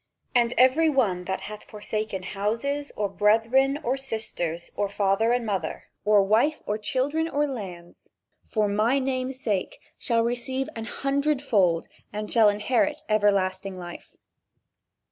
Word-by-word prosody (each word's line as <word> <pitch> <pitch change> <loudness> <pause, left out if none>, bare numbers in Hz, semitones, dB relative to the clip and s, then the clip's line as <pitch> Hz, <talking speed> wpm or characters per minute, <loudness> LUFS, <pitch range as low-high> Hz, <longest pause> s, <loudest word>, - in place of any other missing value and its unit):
"And 240 -1 +2
every 260 +6 +5
one 200 -11 +1
that 190 0 -3
hath 210 0 -8
forsaken 210 -2 -4
houses, 230 +10 -2
or 210 - +1
brethren 225 +7 +3
or 255 +3 0
sisters, 215 -10 -4
or 205 -1 0
father 200 +3 +2
or 245 - +3
mother, 195 -8 -3
or 210 -1 +5
wife 230 +10 +2
or 210 +1 -2
children, 290 +8 0
or 290 0 +1
lands 185 -10 -8 0.4
for 215 -2 +1
my 215 +6 +2
name's 260 -1 -2
sake 205 -7 -2 0.2
shall 230 -2 +1
receive 245 +3 -2
an 225 -1 -5
hundred 280 +4 0
fold 190 -11 +2 0.2
and 210 0 -3
shall 225 -3 +6
inherit 260 +9 0
everlasting 195 -2 +1
life." 175 -1 -9
220 Hz, 140 wpm, -26 LUFS, 200-265 Hz, 0.4 s, shall